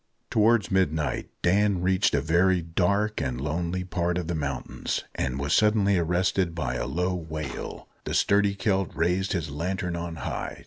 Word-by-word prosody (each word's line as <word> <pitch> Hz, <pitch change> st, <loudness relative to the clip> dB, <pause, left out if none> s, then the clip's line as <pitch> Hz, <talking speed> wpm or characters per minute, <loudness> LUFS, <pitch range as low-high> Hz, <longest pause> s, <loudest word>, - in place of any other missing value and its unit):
Towards 110 Hz, -2 st, +3 dB
midnight 80 Hz, -6 st, 0 dB
Dan 100 Hz, 0 st, +3 dB
reached 95 Hz, 0 st, +2 dB
a -, -, +2 dB
very 90 Hz, +3 st, +3 dB
dark 100 Hz, +5 st, 0 dB
and 65 Hz, -4 st, -2 dB
lonely 85 Hz, +5 st, -2 dB
part 85 Hz, -1 st, -1 dB
of 90 Hz, -, -2 dB
the 85 Hz, -, -2 dB
mountains, 70 Hz, -5 st, -3 dB
and 65 Hz, -1 st, -2 dB
was 70 Hz, +2 st, -1 dB
suddenly 105 Hz, -3 st, +4 dB
arrested 90 Hz, +1 st, +1 dB
by 80 Hz, -7 st, -2 dB
a -, -, -2 dB
low 90 Hz, +7 st, 0 dB
wail. 80 Hz, -5 st, -5 dB, 0.2 s
The -, -, -2 dB
sturdy 100 Hz, 0 st, +3 dB
Celt 95 Hz, -3 st, 0 dB
raised 90 Hz, +3 st, +1 dB
his 80 Hz, -5 st, -2 dB
lantern 90 Hz, +3 st, -2 dB
on 85 Hz, -1 st, -4 dB
high. 80 Hz, -, -4 dB
90 Hz, 165 wpm, -26 LUFS, 80-95 Hz, 0.2 s, suddenly